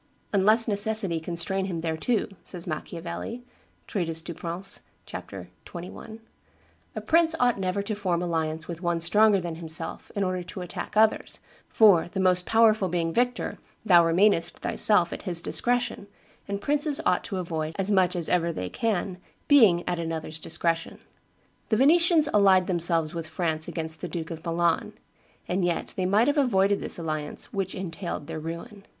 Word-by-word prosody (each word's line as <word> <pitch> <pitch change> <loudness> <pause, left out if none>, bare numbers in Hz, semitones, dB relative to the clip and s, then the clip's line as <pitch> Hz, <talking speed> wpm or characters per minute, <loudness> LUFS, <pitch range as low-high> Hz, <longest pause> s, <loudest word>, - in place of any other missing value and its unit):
"Unless 215 +4 +4
necessity 205 -4 +2
constrain 175 +3 0
him 175 -4 -4
thereto," 165 +8 -1
says 175 -2 -7
Machiavelli 170 +8 -6 0.4
[treatise 165 -5 -3
Du 170 - -6
Prince, 170 +4 -4 0.2
ch. - - -14
xxi.], 185 +5 -9 0.8
"a - - -4
prince 330 0 +3
ought 245 -4 +2
never 190 +1 -1
to 215 +2 -3
form 185 -4 -1
alliance 160 -2 -2
with 170 -1 -7
one 170 -2 0
stronger 205 +4 +4
than 170 -2 -5
himself 165 0 -3
in 200 - 0
order 185 -1 -2
to 180 +1 -8
attack 180 +3 -6
others, 220 0 +2 0.3
for, 200 -7 +5
the 190 - -5
most 180 -1 +2
powerful 220 -4 +3
being 165 -1 -1
victor, 245 +3 -1 0.3
thou 175 -4 +6
remainest, 170 +1 +3
thyself, 180 -5 +2
at - - -7
his 175 -4 +2
discretion, 245 +2 -1 0.4
and 200 0 -4
princes 290 0 +2
ought 180 - +2
to 195 - -5
avoid, 160 -3 -4
as 195 +1 -1
much 185 -2 +3
as 170 -2 -1
ever 170 -1 +1
they 90 - -5
can, 195 - -2 0.3
being 215 -12 +5
at 175 -1 -1
another's 160 -1 -4
discretion. 165 +1 -1 0.7
The 220 - +2
Venetians 325 +3 +4
allied 195 -3 +5
themselves 170 -3 +3
with 165 -2 -5
France 160 -1 -2
against 160 -1 -5
the 180 - -5
Duke 165 -2 -5
of 160 -1 -7
Milan; 170 0 0 0.5
and 185 +1 -1
yet 175 -1 -2
they 185 -1 -1
might 210 +5 +3
have 290 +1 +2
avoided 200 -6 +2
this - - -1
alliance, 155 -3 -5
which 195 -1 -3
entailed 180 -4 -5
their 160 +1 -6
ruin." 170 +6 -8
180 Hz, 165 wpm, -26 LUFS, 165-205 Hz, 0.8 s, thou